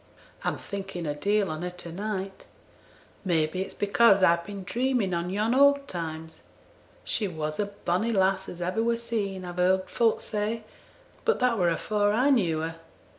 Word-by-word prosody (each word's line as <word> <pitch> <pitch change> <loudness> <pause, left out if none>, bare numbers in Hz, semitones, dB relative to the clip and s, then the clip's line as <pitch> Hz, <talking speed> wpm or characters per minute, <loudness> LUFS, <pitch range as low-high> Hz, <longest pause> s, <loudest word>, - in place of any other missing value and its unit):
I'm - - -1
thinking 195 -3 -6
a 145 - -1
deal 200 +5 +1
on 155 +1 -5
her 180 - -2
to 175 -1 -9
night; 195 +1 -4 0.8
may 165 -4 +2
be 170 +4 -4
it's 190 - -5
because 200 -1 +4
I've 170 -1 +4
been 200 +1 -7
dreaming 240 -2 0
on 170 +1 -1
yon 210 +5 0
old 280 +1 +5
times. 160 -2 -6 0.6
She 210 - 0
was 155 -2 -4
a 205 - +1
bonny 200 +1 -1
lass 190 -2 +1
as 175 0 -6
ever 185 +5 0
were 230 0 +1
seen, 205 -5 -3
I've 175 0 -7
heerd 185 +1 +2
folk 230 -2 +2
say; 215 +1 -3 0.6
but 460 - +2
that 250 -2 +2
were 175 -1 +3
afore 205 +5 +1
I 255 +6 +3
knew 170 - +2
her. 165 +1 -4
195 Hz, 180 wpm, -27 LUFS, 175-220 Hz, 0.8 s, old